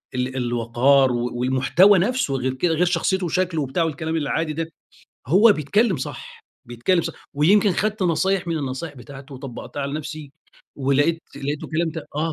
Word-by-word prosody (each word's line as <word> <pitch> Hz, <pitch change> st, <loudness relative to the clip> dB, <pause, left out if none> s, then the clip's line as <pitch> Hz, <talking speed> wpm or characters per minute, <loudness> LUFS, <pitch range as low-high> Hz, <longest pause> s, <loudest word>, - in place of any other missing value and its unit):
ال 125 Hz, +1 st, -2 dB
الوَقار، 125 Hz, +2 st, +2 dB
و 120 Hz, 0 st, -1 dB
والمحتوى 130 Hz, +10 st, +4 dB
نفسه 230 Hz, -, 0 dB
غير 130 Hz, 0 st, -1 dB
كده 160 Hz, +6 st, 0 dB
غير 175 Hz, +3 st, +2 dB
شخصيته 180 Hz, +2 st, 0 dB
وشكله 175 Hz, -2 st, 0 dB
وبتاع 140 Hz, +5 st, -1 dB
الكلام 160 Hz, +1 st, -3 dB
العادي 155 Hz, +1 st, -1 dB
ده، 165 Hz, +1 st, -4 dB, 0.6 s
هو 200 Hz, -, +6 dB
بيتكلّم 195 Hz, -, +1 dB
صح. 130 Hz, -, -8 dB, 0.2 s
بيتكلّم 120 Hz, +10 st, 0 dB
صح. -, -, -4 dB, 0.2 s
ويمكن 190 Hz, +7 st, +4 dB
خدت 210 Hz, +2 st, -1 dB
نصايح 185 Hz, +2 st, +1 dB
من 165 Hz, -2 st, -1 dB
النصايح 140 Hz, +3 st, -5 dB
بتاعته 135 Hz, +2 st, -11 dB
وطبّقتها 135 Hz, +2 st, -7 dB
على 140 Hz, +1 st, -3 dB
نفسي 155 Hz, -1 st, -6 dB, 0.4 s
ولقيت 145 Hz, +5 st, +1 dB
لقيته 145 Hz, +1 st, -4 dB
كلام 160 Hz, +1 st, -1 dB
ت 160 Hz, -1 st, -7 dB
آه 160 Hz, +1 st, 0 dB
155 Hz, 160 wpm, -22 LUFS, 135-175 Hz, 0.6 s, هو